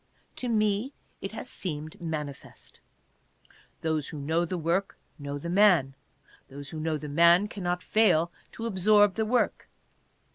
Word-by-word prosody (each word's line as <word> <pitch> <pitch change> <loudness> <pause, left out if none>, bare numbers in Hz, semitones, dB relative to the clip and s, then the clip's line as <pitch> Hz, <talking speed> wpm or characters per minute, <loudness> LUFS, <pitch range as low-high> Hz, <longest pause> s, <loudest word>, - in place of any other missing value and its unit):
To 250 - -3
me 215 +3 +1 0.3
it - - -5
has - - -6
seemed 155 -3 -5
manifest. 150 -4 -7 1.0
Those 155 -3 -1
who 155 - -7
know 160 +4 0
the 180 +2 -3
work 170 +4 -1 0.2
know 145 0 -5
the 145 - -7
man. 175 -7 +4 0.5
Those 140 0 -9
who 160 - -6
know 155 0 -1
the 150 - -7
man 170 +6 +5
cannot 180 -3 -3
fail 175 -6 +3 0.2
to 230 - -6
absorb 205 -1 +4
the 220 +1 -1
work. 245 +2 0
170 Hz, 145 wpm, -28 LUFS, 155-205 Hz, 1.0 s, man